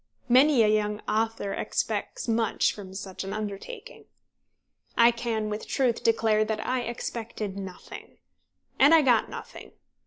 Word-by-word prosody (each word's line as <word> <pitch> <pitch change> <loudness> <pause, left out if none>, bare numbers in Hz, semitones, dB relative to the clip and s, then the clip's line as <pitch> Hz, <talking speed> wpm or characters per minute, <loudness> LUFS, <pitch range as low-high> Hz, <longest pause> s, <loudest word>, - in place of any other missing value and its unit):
Many 260 0 +5
a - - +4
young 210 0 +1
author 220 -2 -1
expects - - -3
much 225 -1 +1
from 190 -2 -10
such 195 -1 -6
an 195 - -5
undertaking. 215 - -7 0.9
I 235 +1 +7
can 230 -2 -2
with 210 +1 -5
truth 250 -4 0
declare 220 -1 +3
that 215 0 -3
I 255 0 0
expected 230 -3 -5
nothing. 190 -2 -9 0.6
And 285 +5 +7
I 320 - +5
got 245 -4 +3
nothing. - - -10
225 Hz, 135 wpm, -27 LUFS, 210-240 Hz, 0.9 s, I